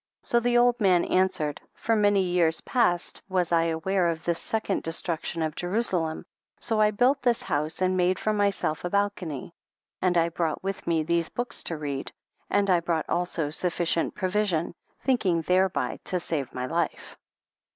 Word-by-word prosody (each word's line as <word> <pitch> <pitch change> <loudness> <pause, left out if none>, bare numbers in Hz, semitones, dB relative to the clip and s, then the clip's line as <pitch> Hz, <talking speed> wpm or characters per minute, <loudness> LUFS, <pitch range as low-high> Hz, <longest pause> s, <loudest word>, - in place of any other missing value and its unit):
So 235 - +2
the 240 0 +2
old 245 0 +3
man 185 -3 +4
answered, 170 -6 0
for 225 - 0
many 205 -2 +3
years 175 -3 +2
past 230 -9 0
was 180 -2 0
I 165 -1 +3
aware 170 +2 +1
of 165 -1 -3
this 170 -1 0
second 220 -1 -1
destruction 165 0 -2
of 155 -1 -2
Jerusalem, 175 -4 -1 0.3
so 220 -2 0
I 210 - +5
built 250 +6 +2
this 240 -2 +1
house 155 +4 -1
and 185 0 +2
made 185 0 +2
for 215 - 0
myself 200 -6 0
a 175 - -2
bal 200 +2 +2
cony, 160 -9 -6
J - - -30 0.5
and 180 -1 +2
I 170 0 +3
brought 165 -1 -2
with 195 0 -4
me 165 -2 +2
these 170 +1 0
books 245 0 -3
to 165 - -3
read, 140 -2 -4 0.4
and 205 0 +2
I 175 - +5
brought 165 -2 -1
also 170 -4 -1
sufficient 170 0 0
provision, 185 -4 0 0.3
thinking 195 -11 +1
thereby 185 +2 +1
to|| 180 - -1
save 150 -6 -3
my 125 0 -4
life. 165 +3 -2
180 Hz, 175 wpm, -26 LUFS, 165-205 Hz, 0.5 s, I